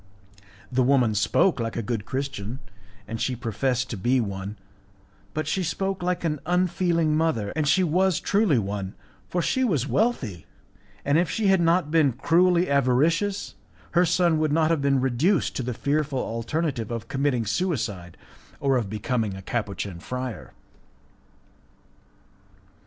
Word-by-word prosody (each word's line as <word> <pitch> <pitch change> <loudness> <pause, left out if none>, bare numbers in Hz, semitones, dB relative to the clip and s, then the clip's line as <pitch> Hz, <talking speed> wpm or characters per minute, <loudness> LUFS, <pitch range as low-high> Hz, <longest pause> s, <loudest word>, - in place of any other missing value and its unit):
The 130 +1 +2
woman 125 -3 +3
spoke 130 - +2
like 115 0 -3
a 115 - -1
good 110 -2 -3
Christian, 130 -3 -4 0.5
and 115 +1 -5
she 130 - 0
professed 125 +2 -1
to 115 - -4
be 125 +7 +2
one; 100 -1 -4 0.8
but 155 0 -1
she 190 - 0
spoke 190 +3 -2
like 180 0 -1
an 150 -3 -1
unfeeling 175 -3 +1
mother, 155 -11 0
and 155 -2 0
she 185 +6 +4
was 180 +2 +2
truly 200 - +2
one, 100 -2 -3 0.3
for 175 -1 -1
she 260 - +1
was 155 - +1
wealthy, 130 - -1 0.6
and 145 +3 +3
if 175 -2 +1
she 215 -3 +1
had 190 -2 +4
not 165 -2 +2
been 155 -5 +4
cruelly 175 +7 +3
avaricious 150 +9 +1 0.4
her 175 - +4
son 170 -2 +2
would 155 -1 +1
not 160 +1 +3
have 160 -4 +1
been 140 -1 +2
reduced 135 - +1
to - - -1
the 125 0 -3
fearful 145 +1 -1
alternative 120 +1 -2
of 115 -1 -5
committing 135 -4 0
suicide 110 - -2 0.4
or 135 -2 +2
of 110 -5 -2
becoming 110 0 -2
a 95 - -9
Capuchin 100 -5 -3
friar. 125 +4 -6
140 Hz, 150 wpm, -25 LUFS, 115-170 Hz, 0.8 s, she